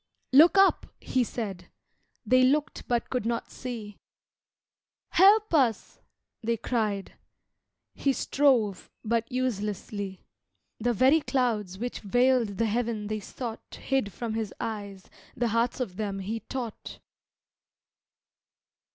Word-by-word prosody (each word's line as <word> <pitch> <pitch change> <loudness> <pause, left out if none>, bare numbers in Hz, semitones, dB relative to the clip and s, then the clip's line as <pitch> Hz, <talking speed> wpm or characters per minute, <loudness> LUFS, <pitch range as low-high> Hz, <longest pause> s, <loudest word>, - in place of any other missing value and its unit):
"Look 320 +8 +7
up!" 390 0 +4
he 255 - 0
said. 200 -6 -5 0.6
They 255 +4 +5
looked 285 +3 +1
but 240 -1 -1
could 250 -3 -1
not 230 +1 -2
see. 225 -5 -7 1.1
"Help 410 +2 +5
us!" 250 -9 +1 0.4
they 230 0 0
cried. 215 -4 -2 0.8
He 275 - +1
strove, 255 -8 +1 0.2
but 230 +1 0
uselessly 205 -5 -3 0.5
The 240 +2 +1
very 260 +8 +5
clouds 225 -10 -1
which 245 +4 -4
veiled 245 -1 +2
the 230 - +2
heaven 220 -1 -1
they 215 0 -2
sought 225 +2 -7
Hid 265 -7 -1
from 230 +3 -4
his 220 -2 -2
eyes 200 -3 -5 0.3
the 240 -1 +1
hearts 230 +4 0
of 200 -8 -4
them 205 -2 -2
he 205 +4 -3
taught! 240 -2 -6
230 Hz, 115 wpm, -27 LUFS, 210-255 Hz, 1.1 s, Look